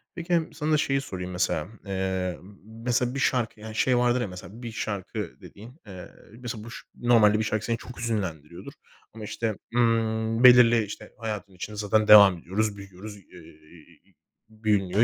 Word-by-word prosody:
Peki, 170 -1 -1
sana 155 +1 -2
da 155 - +4
şeyi 135 -1 0
sorayım 90 -7 -6
mesela. 90 -3 -1 0.2
Eee, 95 -2 -2 0.2
mesela 120 +3 -2
bir 140 - -2
şarkı, 120 -5 0
yani 110 0 -9
şey 125 +2 +2
vardır 125 0 +2
ya - - -2
mesela 95 +5 -11
bir 115 - -5
şarkı 100 -4 -5
dediğin, 120 +9 -13
eee 95 -2 -10 0.3
mesela 120 -3 -6
buş 115 +2 -10
normalde 110 -3 +4
bir 110 - 0
şarkı 110 -1 -2
seni 115 -1 -1
çok 125 - -12
hüzünlendiriyordur. 90 -7 -4 0.4
Ama 110 -1 -9
işte, 110 +1 -3 0.2
ımm, 115 0 +1
belirli 120 -2 +7
işte 105 - -9
hayatın 105 -3 -5
içinde 105 +3 -8
zaten 105 +1 +1
devam 100 -4 +9
ediyoruz, 100 +4 -2
büyüyoruz, 100 +1 -10
eee, 90 -5 -16 0.9
büyünüyor 105 -2 +1
110 Hz, 160 wpm, -26 LUFS, 95-120 Hz, 0.9 s, devam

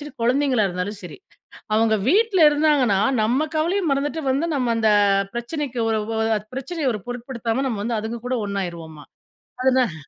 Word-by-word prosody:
சரி, 295 - -8
கொழந்தைங்களா 250 -3 +2
இருந்தாலும் 185 +3 -4
சரி. 180 - -9 0.6
அவங்க 220 0 +3
வீட்டுல 390 -4 +4
இருந்தாங்கன்னா, 290 -9 +2 0.2
நம்ம 255 +8 +1
கவலைய 350 +6 0
மறந்துட்டு 290 +3 -1
வந்து 280 +5 0
நம்ம 245 -4 0
அந்த 220 -1 +2 0.5
பிரச்சனைக்கு 255 +1 -4
ஒரு 220 -1 +1 0.2
ஒ - - -1 0.2
அ - - -4 0.2
பிரச்சனைய 280 +3 -3
ஒரு 210 - -7
பொருட்படுத்தாம 245 0 -3
நம்ம 215 -5 -3
வந்து 230 +1 -1
அதுங்க 225 +2 -5
கூட 255 - -1
ஒன்னாயிருவோமா! 170 -6 -5 0.6
அது 260 0 +3
தான். 225 -9 0
245 Hz, 160 wpm, -22 LUFS, 215-290 Hz, 0.6 s, வீட்டுல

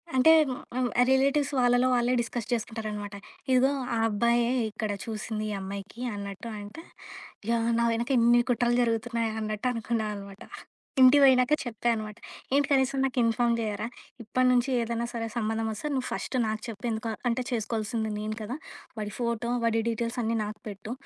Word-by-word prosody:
అంటే 260 +5 +6 0.2
హ్మ్, 255 - -4 0.2
అం 255 - +2 0.2
రిలేటివ్స్ 275 +2 +3
వాళ్ళలో 245 +1 +4
వాళ్ళే 240 +1 +2
డిస్కస్ 235 -1 -4
జేసుకుంటారనమాట. 215 -3 -3 0.4
"ఇదిగో 260 +2 +4 0.2
ఆ - - 0
అబ్బాయే, 235 +3 +2 0.2
ఇక్కడ 215 0 -3
చూసింది 215 -1 -4
ఈ - - -3
అమ్మాయికి" 200 +4 -7
అన్నట్టు. 200 +2 -6
అంటే 205 +10 -9 0.7
ఇగ 235 - +2 0.3
నా 235 - +3
వెనక 235 +3 -2
ఇన్ని 240 +1 +5
కుట్రలు 240 0 +2
జరుగుతున్నాయా 230 -1 0
అన్నట్టు 215 +2 -2
అనుకున్నా 230 -1 -1
అనమాట. 200 -1 -9 0.6
ఇంటికి 260 +3 +8
పోయినాక 255 +1 +5
చెప్పా 240 -1 -2
అనమాట, 215 -1 -5 0.4
"ఏంటి? 285 0 +4
కనీసం 270 0 +2
నాకు 265 -1 -1
ఇన్ఫార్మ్ 235 +1 +2
జేయరా? 215 0 -2 0.4
ఇప్పటి 255 +3 +1
నుంచి 250 +2 +2
ఏదైనా 235 0 -2
సరే 230 -1 -3
సంబంధం 225 0 -1
ఒస్తే 220 +8 -4
నువ్వు 260 -1 -1
ఫస్టు 255 - -2
నాకు 215 0 -2
చెప్పు 230 +2 -6
ఎందుకొ 225 +1 -2 0.2
అంటే 240 +2 0
చేసుకోవాల్సింది 220 -1 -2
నేను 215 0 -3
కదా! 230 +5 -4 0.4
వాడి 210 -1 -4
ఫోటో, 235 -1 -1
వాడి 225 0 +2
డీటెయిల్స్ 230 +1 -2
అన్నీ 225 +1 0
నాకు 210 0 -7
పెట్టు" 205 +2 -7
230 Hz, 160 wpm, -28 LUFS, 215-245 Hz, 0.7 s, ఇంటికి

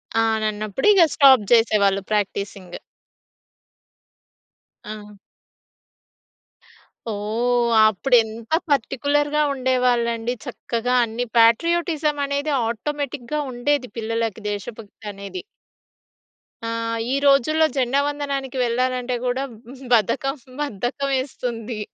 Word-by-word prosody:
ఆ! 225 - +3 0.3
అన్నప్పుడు 215 - -3
ఇగ 385 - +5
స్టాప్ 265 -6 +6
చేసేవాళ్ళు 200 -4 +3
ప్రాక్టీసింగ్. 200 -3 -3 2.1
ఆ! 210 -1 -9 1.9
ఓహ్! 235 +3 0 0.2
అప్పుడు 245 +5 +1
ఎంత 220 +2 -10 0.2
పార్టిక్యులర్‌గా 290 +3 +1
ఉండేవాళ్ళండి. 245 -2 0
చక్కగా 245 0 -3
అన్ని 230 +2 -4
పేట్రియోటిజం 305 - +3
అనేది 285 +2 -2 0.2
ఆటోమేటిక్‌గా 285 +3 -4
ఉండేది. 250 +1 -1
పిల్లలకి 225 -1 -2
దేశభక్తి 210 +1 -8
అనేది. 200 - -7 1.2
ఆ! - - -2 0.4
ఈ - - +2
రోజుల్లో 285 +3 +4
జెండా 260 +2 +2
వందనానికి 280 -2 -3
వెళ్ళాలంటే 250 +1 -1
కూడా 250 +2 -1 0.5
బద్ధకం, 270 +6 +1 0.3
బద్ధకం 275 +3 -3
వేస్తుంది. 240 -4 -4
245 Hz, 85 wpm, -22 LUFS, 220-275 Hz, 2.1 s, స్టాప్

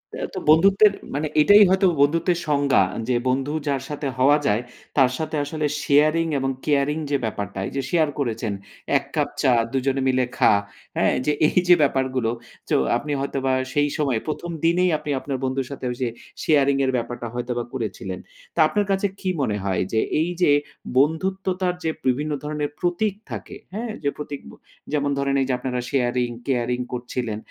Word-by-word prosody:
এ্যা - - -3
তো - - -2
বন্ধুত্বের 195 +6 +6 0.2
মানে 150 +3 -1
এটাই 205 +6 +8
হয়তো 190 +1 +3 0.2
বন্ধুত্বের 165 +4 +3
সংজ্ঞা। 140 -7 +3 0.3
যে 125 - +3
বন্ধু 135 +3 0
যার 135 -2 0
সাথে 145 -1 -3
হওয়া 140 +3 +5
যায়, 105 +3 +2 0.4
তার 130 -2 +5
সাথে 155 0 -3
আসলে 155 +1 -3 0.2
শেয়ারিং 155 +3 +3
এবং 135 0 0 0.2
কেয়ারিং 145 0 +2
যে 140 - +3
ব্যাপারটাই 100 -3 -4
যে 135 - 0
শেয়ার 160 -2 +2
করেছেন 115 -5 -1 0.4
এক - - -3
কাপ - - +1
চা 130 - +4 0.2
দুজনে 135 0 0
মিলে 130 -1 +2
খা। - - +5 0.4
হ্যাঁ? - - +3 0.4
এই 180 - +2
যে 175 - +8
ব্যাপারগুলো 130 -4 0 0.4
তো - - +3 0.2
আপনি 150 - -5
হয়তো 140 0 -3
বা 130 - +2 0.2
সেই 145 0 +2
সময় 135 -6 +1
প্রথম 170 +3 -3
দিনেই 180 +2 +3
আপনি 150 - -8
আপনার 135 0 -4
বন্ধুর 130 -1 -1
সাথে 140 - -6 0.2
যে 125 - +1 0.4
শেয়ারিং 140 -3 +3 0.2
ব্যাপারটা 120 0 -4
হয়তোবা 120 0 -2
করেছিলেন। 95 -6 -4 0.4
তা - - -3
আপনার 205 +5 0
কাছে 195 +1 +2
কি 185 - -2
মনে 105 -6 0
হয়? 95 -2 0
যে 110 - +3 0.2
এই 165 - 0
যে 145 - +5 0.5
বন্ধুত্বতা 185 +5 +1 0.2
যে 160 - +1 0.2
বিভিন্ন 145 +4 +1
ধরনের 150 -1 -2
প্রতীক 180 +4 0 0.2
থাকে, - - -6 0.2
হ্যাঁ? 225 +2 -3
যে 145 - +2
প্রতীক, 145 -1 -6 0.5
যেমন 145 -1 +1
ধরেন 140 0 0
এই 135 - +1
যে - - +2
আপনারা 125 -1 -2
শেয়ারিং 125 -2 +1 0.2
কেয়ারিং 125 -2 0
করছিলেন 120 -3 -3
140 Hz, 170 wpm, -23 LUFS, 125-155 Hz, 0.5 s, এটাই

